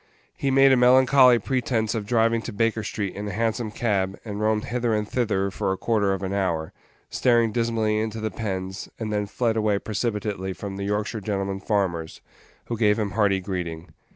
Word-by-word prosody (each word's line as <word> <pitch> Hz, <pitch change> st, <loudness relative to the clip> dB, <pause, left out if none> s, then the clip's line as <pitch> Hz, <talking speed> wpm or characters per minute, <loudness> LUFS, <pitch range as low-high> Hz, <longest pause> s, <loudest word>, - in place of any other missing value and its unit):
He 140 Hz, -, -1 dB
made 135 Hz, 0 st, +6 dB
a -, -, +6 dB
melancholy 125 Hz, 0 st, +6 dB
pretence 115 Hz, -2 st, -1 dB
of 110 Hz, -3 st, -3 dB
driving 115 Hz, 0 st, +2 dB
to 120 Hz, -, -6 dB
Baker 115 Hz, +1 st, 0 dB
street 100 Hz, -2 st, -3 dB
in 105 Hz, +1 st, -5 dB
a -, -, -3 dB
Hansom 115 Hz, +2 st, -1 dB
cab, 100 Hz, -4 st, -1 dB
and 105 Hz, -1 st, -5 dB
roamed 110 Hz, 0 st, +1 dB
hither 120 Hz, -2 st, 0 dB
and 105 Hz, 0 st, -1 dB
thither 105 Hz, -5 st, 0 dB
for 95 Hz, -, -1 dB
a 95 Hz, -, -1 dB
quarter 105 Hz, -3 st, +1 dB
of 95 Hz, 0 st, -2 dB
an 95 Hz, +1 st, -2 dB
hour, 85 Hz, -5 st, -1 dB, 0.4 s
staring 120 Hz, -3 st, +3 dB
dismally 110 Hz, -2 st, 0 dB
into 110 Hz, 0 st, -3 dB
the 110 Hz, -1 st, -3 dB
pens, 95 Hz, -3 st, -4 dB
and 110 Hz, -2 st, -4 dB
then 105 Hz, -1 st, -1 dB
fled 115 Hz, +2 st, 0 dB
away 105 Hz, -2 st, +2 dB
precipitately 105 Hz, -3 st, -3 dB
from 95 Hz, 0 st, -7 dB
the 100 Hz, -, -3 dB
Yorkshire 105 Hz, +2 st, -2 dB
gentlemen 100 Hz, -1 st, -2 dB
farmers, 95 Hz, -6 st, -1 dB, 0.5 s
who 115 Hz, -2 st, -4 dB
gave 105 Hz, -2 st, +3 dB
him 105 Hz, -3 st, -1 dB
hearty 100 Hz, -3 st, +2 dB
greeting. 90 Hz, -3 st, -5 dB
105 Hz, 190 wpm, -24 LUFS, 100-115 Hz, 0.5 s, made